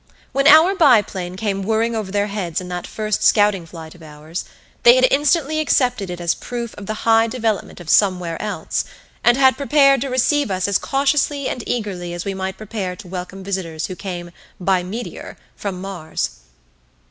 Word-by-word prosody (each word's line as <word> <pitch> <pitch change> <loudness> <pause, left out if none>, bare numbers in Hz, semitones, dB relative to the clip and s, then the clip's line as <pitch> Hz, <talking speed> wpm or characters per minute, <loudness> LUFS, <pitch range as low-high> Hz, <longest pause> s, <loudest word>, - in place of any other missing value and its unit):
When 275 +1 +2
our 315 +5 +8
biplane 200 - +2
came 195 -1 -2
whirring 225 +3 0
over 210 -4 -3
their 205 0 +1
heads 200 -6 -3
in 180 -1 -8
that 180 0 -5
first 215 -1 -2
scouting 205 -5 +3
flight 160 -1 -10
of 175 - -18
ours, 155 +3 -7 0.4
they 240 +1 +8
had 255 0 +5
instantly 300 +2 +2
accepted 250 -9 +1
it 175 0 -5
as 170 -1 +1
proof 240 -2 -6
of 200 - -10
the 215 0 -5
high 225 0 +5
development 225 -5 -2
of 175 - -11
Some 185 +1 +4
Where 165 -2 -5
Else, 210 -1 -2 0.4
and 240 +1 +5
had 265 -1 +4
prepared 275 -2 +4
to 275 - -2
receive 260 +2 +1
us 185 0 -1
as 200 - +2
cautiously 280 0 0
and 245 - -4
eagerly 185 -7 -3
as 175 - -5
we 200 - -2
might 190 0 -4
prepare 200 -4 -5
to 180 - -12
welcome 185 +1 -7
visitors 180 -5 -3
who 185 - -6
came 175 -3 -6 0.3
"by 185 0 +2
meteor" 210 +7 -7 0.2
from 195 -3 -5
Mars. 185 -5 -4
205 Hz, 185 wpm, -20 LUFS, 180-245 Hz, 0.4 s, our